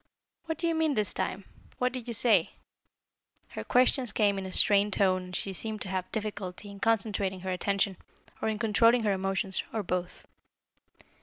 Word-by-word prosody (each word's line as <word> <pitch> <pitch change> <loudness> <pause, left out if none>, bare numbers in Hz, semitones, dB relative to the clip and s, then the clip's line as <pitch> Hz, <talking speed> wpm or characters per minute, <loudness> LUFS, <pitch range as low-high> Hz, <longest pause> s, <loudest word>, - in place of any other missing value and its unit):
"What 320 -2 -3
do 335 - 0
you 335 - +1
mean, 320 -3 +1
this 210 -2 0
time? 195 - -3 0.3
What 250 0 0
did 250 -2 -6
you 235 - -2
say?" 220 -7 +4 1.0
Her 110 - -6
questions 250 - +2
came 205 -2 +2
in 190 - -5
a - - -7
strained 205 +1 +4
tone 185 -2 +2
and 180 0 -8
she 195 - -2
seemed 215 +3 -4
to 190 - -2
have 185 -1 -3
difficulty 205 -2 -5
in 200 - -11
concentrating 200 -4 0
her 190 0 -3
attention, 195 +1 0 0.4
or - - 0
in 215 - -2
controlling 230 +2 +3
her 205 -2 +2
emotions, 195 0 -1
or 220 -2 -2
both. 180 -1 -4
205 Hz, 180 wpm, -29 LUFS, 190-225 Hz, 1.0 s, say